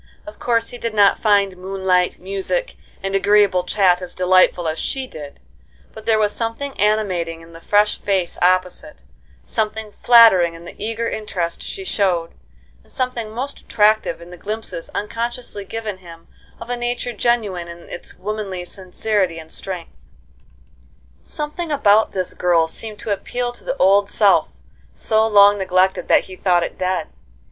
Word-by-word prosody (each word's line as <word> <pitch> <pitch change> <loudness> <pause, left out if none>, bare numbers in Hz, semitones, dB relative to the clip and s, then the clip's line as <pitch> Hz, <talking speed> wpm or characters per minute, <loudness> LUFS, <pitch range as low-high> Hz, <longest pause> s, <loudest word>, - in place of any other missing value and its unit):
Of 310 - -11
course 230 -1 0
he 245 - -9
did 230 -2 -4
not 200 -1 +5
find 200 -3 +2
moonlight, 185 -1 0
music, 195 - -3 0.3
and 195 0 -2
agreeable 200 -2 +3
chat 185 -2 +3
as 180 -1 -8
delightful 185 -1 +3
as 160 0 -2
she 265 -1 -2
did; 150 - -10 0.5
but 220 - -12
there 220 -1 +4
was 210 -1 +1
something 235 +5 -3
animating 185 -6 0
in 165 0 -15
the 165 - -12
fresh 210 +2 +2
face 190 -4 0
opposite, 185 0 +1 0.5
something 215 - -2
flattering 220 -8 +6
in 165 +1 -12
the - - -9
eager 225 +1 -2
interest 180 -7 -3
she 385 - -6
showed, 180 - 0 0.5
and - - -23
something 250 -4 -3
most 255 +6 -5
attractive 210 -5 +1
in 170 +1 -12
the 180 - -10
glimpses 210 -3 -5
unconsciously 230 -1 -4
given 220 -2 -5
him 165 -2 -14 0.3
of 230 +1 -7
a - - 0
nature 240 0 -3
genuine 210 -7 0
in 170 0 -11
its - - -8
womanly 195 -3 -4
sincerity 190 0 -2
and 160 0 -10
strength. 185 -3 -6 1.3
Something 305 +2 -5
about 220 -6 +4
this 185 -2 -1
girl 170 -2 +2
seemed 215 +6 -8
to 215 - -4
appeal 245 +4 -3
to - - -8
the 265 - -3
old 200 +2 +4
self, 205 -3 +3 0.5
so 220 0 +1
long 205 -1 +6
neglected 190 0 +1
that - - +4
he 185 - -10
thought 180 -3 +2
it - - -6
dead. 185 -3 -1
200 Hz, 160 wpm, -20 LUFS, 180-225 Hz, 1.3 s, flattering